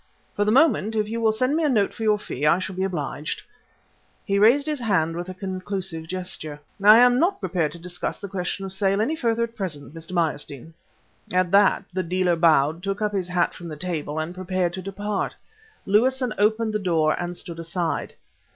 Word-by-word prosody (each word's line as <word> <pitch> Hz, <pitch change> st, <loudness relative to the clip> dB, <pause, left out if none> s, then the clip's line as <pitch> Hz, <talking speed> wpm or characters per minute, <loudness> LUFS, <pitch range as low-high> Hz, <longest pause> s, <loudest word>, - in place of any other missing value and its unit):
For 205 Hz, -, +1 dB
the 210 Hz, -, +2 dB
moment 225 Hz, -5 st, +3 dB
if 215 Hz, -1 st, +1 dB
you 230 Hz, +2 st, -3 dB
will 220 Hz, -1 st, +4 dB
send 255 Hz, +6 st, +1 dB
me 325 Hz, -, +1 dB
a 300 Hz, -, +3 dB
note 215 Hz, -6 st, +2 dB
of -, -, -15 dB
your 215 Hz, -1 st, +3 dB
fee, 145 Hz, -9 st, -6 dB
I 150 Hz, -, +5 dB
shall 185 Hz, 0 st, -5 dB
be 190 Hz, -, -1 dB
obliged." 155 Hz, -5 st, -3 dB, 0.8 s
He 200 Hz, -1 st, +1 dB
raised 245 Hz, +7 st, +5 dB
his 305 Hz, -2 st, -2 dB
hand 185 Hz, -8 st, +1 dB
with 175 Hz, +2 st, -5 dB
a 185 Hz, -, -7 dB
conclusive 185 Hz, -3 st, -4 dB
gesture. 180 Hz, -5 st, -4 dB, 0.2 s
"I 210 Hz, +2 st, +9 dB
am 245 Hz, +1 st, +6 dB
not 385 Hz, +5 st, +2 dB
prepared 165 Hz, -, -1 dB
to -, -, -9 dB
discuss 175 Hz, +1 st, -4 dB
the 200 Hz, -, -6 dB
question 195 Hz, 0 st, -3 dB
of 190 Hz, -, -5 dB
sale 195 Hz, 0 st, +1 dB
any 270 Hz, +9 st, +1 dB
further 235 Hz, -5 st, 0 dB
at 235 Hz, 0 st, -5 dB
present, 155 Hz, -8 st, -5 dB
Mr. 165 Hz, +2 st, -8 dB
Meyerstein." 160 Hz, -3 st, -2 dB, 0.6 s
At 180 Hz, -1 st, +1 dB
that 200 Hz, -1 st, +4 dB
the 185 Hz, -, 0 dB
dealer 180 Hz, 0 st, +1 dB
bowed, 160 Hz, -1 st, +3 dB
took 195 Hz, +1 st, -3 dB
up 210 Hz, -1 st, 0 dB
his 190 Hz, -3 st, -1 dB
hat 180 Hz, -1 st, +1 dB
from 175 Hz, -, -9 dB
the 155 Hz, -, -6 dB
table, 155 Hz, -3 st, -3 dB
and 155 Hz, +2 st, -3 dB
prepared 185 Hz, -1 st, -1 dB
to 190 Hz, -, -5 dB
depart. 200 Hz, +2 st, -3 dB, 0.5 s
Lewison 250 Hz, +4 st, +2 dB
opened 220 Hz, +1 st, +2 dB
the 215 Hz, -, 0 dB
door 165 Hz, -5 st, +2 dB
and 175 Hz, 0 st, -4 dB
stood 170 Hz, -1 st, -7 dB
aside. 165 Hz, 0 st, -2 dB
190 Hz, 205 wpm, -24 LUFS, 170-215 Hz, 0.8 s, I